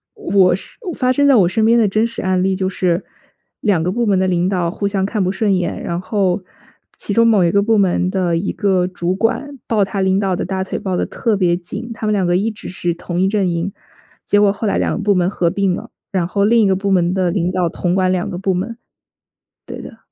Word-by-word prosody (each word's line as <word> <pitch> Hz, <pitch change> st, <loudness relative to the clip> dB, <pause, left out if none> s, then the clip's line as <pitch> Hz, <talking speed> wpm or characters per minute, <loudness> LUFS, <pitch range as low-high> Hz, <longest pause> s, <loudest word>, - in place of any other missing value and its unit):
我 195 Hz, -, +3 dB
是 -, -, -12 dB, 0.2 s
发 255 Hz, -1 st, +1 dB
生 285 Hz, +2 st, +3 dB
在 275 Hz, -, +6 dB
我 185 Hz, -6 st, +5 dB
身 220 Hz, +4 st, 0 dB
边 230 Hz, +2 st, +4 dB
的 225 Hz, -3 st, +4 dB
真 215 Hz, +4 st, +1 dB
实 235 Hz, -, -6 dB
案 185 Hz, -1 st, +1 dB
例 190 Hz, 0 st, +1 dB
就 190 Hz, 0 st, -1 dB
是， 180 Hz, -1 st, 0 dB, 0.6 s
2 190 Hz, -6 st, +1 dB
个 180 Hz, -, 0 dB
部 235 Hz, +2 st, -1 dB
门 195 Hz, -2 st, +3 dB
的 190 Hz, -, +1 dB
领 180 Hz, 0 st, +1 dB
导 175 Hz, -3 st, 0 dB
互 200 Hz, +3 st, -2 dB
相 195 Hz, -1 st, -1 dB
看 205 Hz, -1 st, -1 dB
不 185 Hz, -, 0 dB
顺 200 Hz, -1 st, +1 dB
眼， 180 Hz, -1 st, -2 dB
然 170 Hz, 0 st, -2 dB
后 190 Hz, -1 st, 0 dB, 0.5 s
其 -, -, -3 dB
中 230 Hz, +3 st, +4 dB
某 210 Hz, -5 st, +4 dB
一 170 Hz, -, +2 dB
个 200 Hz, +2 st, +3 dB
部 225 Hz, +1 st, +2 dB
门 185 Hz, -2 st, +2 dB
的 180 Hz, -3 st, 0 dB
一 195 Hz, -, -2 dB
个 190 Hz, -3 st, +1 dB
主 175 Hz, 0 st, -2 dB
管 260 Hz, +7 st, -1 dB
抱 215 Hz, -3 st, +2 dB
他 195 Hz, +1 st, -3 dB
领 190 Hz, 0 st, +2 dB
导 195 Hz, -3 st, 0 dB
的 -, -, -3 dB
大 190 Hz, +1 st, -2 dB
腿 190 Hz, -, -4 dB
抱 190 Hz, -3 st, -2 dB
得 -, -, 0 dB
特 225 Hz, -3 st, -1 dB
别 175 Hz, -3 st, +2 dB
紧， 185 Hz, +6 st, -7 dB
他 225 Hz, -, -6 dB
们 215 Hz, -, +1 dB
2 195 Hz, -3 st, +1 dB
个 175 Hz, +1 st, +2 dB
一 215 Hz, +4 st, 0 dB
直 210 Hz, -, -9 dB
是 175 Hz, -1 st, -2 dB
同 175 Hz, +1 st, -5 dB
一 190 Hz, -, +3 dB
阵 195 Hz, -2 st, +1 dB
营， 170 Hz, +3 st, -2 dB, 0.5 s
结 205 Hz, -, +2 dB
果 205 Hz, -1 st, +4 dB
后 210 Hz, +1 st, -3 dB
来 -, -, +1 dB
2 -, -, 0 dB
个 -, -, -3 dB
部 205 Hz, -1 st, +2 dB
门 180 Hz, -1 st, +2 dB
合 175 Hz, -4 st, 0 dB
并 195 Hz, 0 st, 0 dB
了， -, -, -8 dB, 0.2 s
然 180 Hz, -3 st, 0 dB
后 200 Hz, +2 st, +1 dB
另 230 Hz, +2 st, +4 dB
一 205 Hz, -, +4 dB
个 190 Hz, -, +2 dB
部 195 Hz, +1 st, -1 dB
门 175 Hz, -1 st, +2 dB
的 185 Hz, -2 st, +1 dB
领 180 Hz, -1 st, 0 dB
导 185 Hz, -1 st, 0 dB
统 175 Hz, +2 st, -1 dB
管 185 Hz, -1 st, +2 dB
2 180 Hz, -1 st, -1 dB
个 175 Hz, -, -5 dB
部 190 Hz, 0 st, 0 dB
门。 205 Hz, +6 st, -3 dB, 0.9 s
对 -, -, -7 dB
的。 225 Hz, -, -11 dB
190 Hz, 270 characters per minute, -18 LUFS, 180-205 Hz, 0.9 s, 在